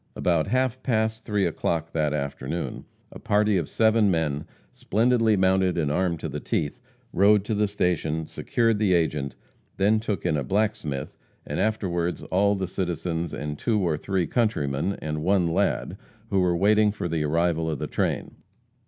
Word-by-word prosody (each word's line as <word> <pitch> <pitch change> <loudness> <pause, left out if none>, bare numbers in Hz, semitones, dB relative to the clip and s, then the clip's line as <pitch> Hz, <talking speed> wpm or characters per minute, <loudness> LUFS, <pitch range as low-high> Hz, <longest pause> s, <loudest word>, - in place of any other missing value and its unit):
About 85 -3 +1
half 130 +2 0
past 110 -2 -1
three 105 -3 +1
o'clock 80 -1 -1
that 75 -2 0
afternoon, 70 +2 -4 0.3
a - - -10
party 105 0 +2
of 85 -5 -2
seven 110 -2 +3
men, 80 -4 0 0.3
splendidly 115 0 +2
mounted 95 -1 +2
and 75 -4 0
armed 85 0 0
to - - -3
the 75 0 -4
teeth, 75 +5 -2 0.3
rode 100 +2 +5
to 110 - -1
the 105 0 +2
station, 80 -5 -1
secured 115 +5 0
the 100 -4 +3
agent, 75 -4 -1 0.4
then 105 +3 +3
took 105 -5 -3
in 80 - +2
a 70 - -1
blacksmith, 100 - -2 0.3
and - - -3
afterwards 90 -6 -1
all 100 +2 +3
the 95 -1 -2
citizens 85 -2 -3
and 75 0 -5
two 110 -3 +1
or 85 -5 +1
three 95 +3 -1
countrymen, 85 - 0
and 75 0 -3
one 95 +1 +2
lad, 85 0 0 0.3
who 95 - +3
were 90 -2 +2
waiting 105 +3 +4
for 100 - -4
the 80 -2 -1
arrival 80 +1 +1
of 75 - -2
the - - -3
train. - - -2
90 Hz, 170 wpm, -25 LUFS, 80-105 Hz, 0.4 s, rode